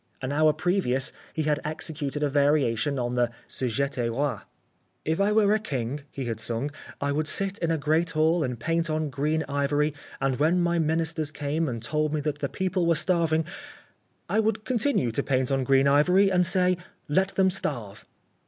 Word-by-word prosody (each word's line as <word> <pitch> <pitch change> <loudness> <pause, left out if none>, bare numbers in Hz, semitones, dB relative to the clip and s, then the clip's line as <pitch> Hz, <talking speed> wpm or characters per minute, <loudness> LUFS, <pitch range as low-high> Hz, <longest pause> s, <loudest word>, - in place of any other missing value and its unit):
An 130 0 -4
hour 155 +1 +4
previous 150 -7 0 0.2
he 155 - -2
had 150 -1 +1
executed 150 -2 -3
a 145 - +2
variation 140 -2 +2
on 120 -1 -2
the 120 -1 +2 0.2
"Si 130 - -3
j'├®tais 125 0 -1
roi." 130 -2 -1 0.7
"If 160 +4 0
I 200 +1 +3
were 210 -1 +4
king," 135 - -3
he 135 - -5
had 115 -2 -3
sung, 120 +6 -2 0.3
"I 140 0 -1
would 150 +2 -1
sit 195 +4 0
in 170 - -1
a 165 - +1
great 155 +3 +1
hall 160 +2 +2
and 125 -4 -3
paint 165 +5 0
on 155 -1 -1
green 150 +4 0
ivory 145 +1 0 0.3
and 135 -1 0
when 165 +5 +3
my 170 -1 +1
ministers 160 -1 0
came 155 +1 -2
and 115 -2 -5
told 155 +3 0
me 150 - -1
that 150 0 -3
the 140 - -2
people 185 -2 -1
were 170 - +4
starving, 165 -2 +1 0.8
I 220 - +1
would 220 -1 0
continue 245 - +1
to 130 - 0
paint 130 -1 0
on 135 -1 +1
green 135 +1 +4
ivory 180 +8 +4
and 180 -1 +4
say: 185 -1 +4 0.3
'Let 190 +6 +1
them 190 -1 +3
starve.'" 120 - -4
150 Hz, 190 wpm, -26 LUFS, 135-170 Hz, 0.8 s, hour